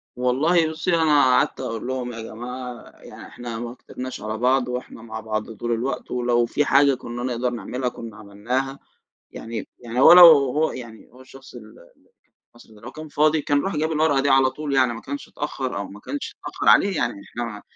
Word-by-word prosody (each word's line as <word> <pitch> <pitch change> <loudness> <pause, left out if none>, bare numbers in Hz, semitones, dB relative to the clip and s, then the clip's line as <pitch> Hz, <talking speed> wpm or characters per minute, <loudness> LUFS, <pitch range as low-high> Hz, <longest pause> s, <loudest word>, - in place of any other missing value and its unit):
والله 155 +7 +2
بُصي، 160 +2 -1
أنا 155 -3 +4
قعدت 130 -1 +2
أقول 115 -2 -5
لهُم: 130 -1 -3
"يا 115 - -7
جماعة 125 +2 -8
يعني - - -12
إحنا 120 -2 -7
ما 120 0 -6
كترناش 130 0 -8
على 110 +1 -4
بعض 125 +2 +2
وإحنا 125 -2 -6
مع 110 -1 -7
بعض 110 0 -4
طول 120 +2 -5
الوقت، 120 +4 -3
ولو 120 -1 +1
في 145 +5 0
حاجة 140 0 +4
كُنّا 120 -1 -7
نقدَر 125 0 -1
نعمِلها 125 +2 -4
كُنّا 115 -3 -10
عمِلناها." 120 +7 -4 0.5
يعني 115 -1 -7
يعني 120 0 -4
هو 135 - +9
لو 180 0 +11
هو 150 -1 +5
يعني 115 -3 -10
هو 125 +2 -16
الشخص 135 0 -15
ال 110 -2 -12 0.8
أصل 120 -2 -18
هو 105 - -17
لو - - -9
كان 155 0 -9
فاضي 155 +1 +2
كان 145 0 +1
راح 195 - -2
جاب 155 +2 -1
الورقة 155 -2 +2
دي 140 - +1
على 135 -1 +5
طول، 145 +1 -4
يعني 130 -3 +3
ما 115 - -8
كانش 140 +6 -7
اتأخَّر 135 -4 -4
أو 100 -1 -4
ما 100 - -12
كانش 285 - -6
يتأخَّر - - -5
عليه، 200 -3 +5
يعني 120 -6 -2
إحنا 120 - -5
ما 105 -3 -8
125 Hz, 205 wpm, -23 LUFS, 115-140 Hz, 0.8 s, لو